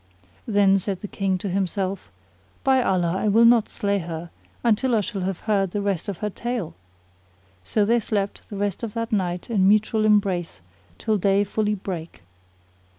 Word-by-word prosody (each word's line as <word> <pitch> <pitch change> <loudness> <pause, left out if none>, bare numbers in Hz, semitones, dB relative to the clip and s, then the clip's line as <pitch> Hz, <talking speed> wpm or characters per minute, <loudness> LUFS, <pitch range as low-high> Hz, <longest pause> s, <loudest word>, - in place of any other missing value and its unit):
Then 200 -3 +4
said 190 -1 -3
the 205 - -5
King 190 -2 -1
in 200 - -2
himself, 195 0 -2 0.5
"By 265 -1 +4
Allah, 180 -6 +1
I 215 - -1
will 225 +3 +5
not 230 -2 +5
slay 200 -1 -1
her, 165 -1 -6 0.3
until 235 +2 +2
I 215 - +3
shall 200 -1 -4
have 185 -1 -3
heard 200 -3 +1
the 205 +3 -3
rest 200 0 -1
of 195 - -4
her - - 0
tale." 235 -5 -4 0.9
So 205 - +1
they 235 +3 +3
slept 205 -2 -3
the 205 - -6
rest 200 -1 -2
of 230 -2 -5
that 230 0 -3
night 180 0 -1
in 195 -4 +3
mutual 215 +1 +3
embrace 195 - +1 0.4
till 215 -2 0
day 200 +2 +3
fully 210 +1 -1
brake. 175 - -7
200 Hz, 175 wpm, -24 LUFS, 190-215 Hz, 0.9 s, will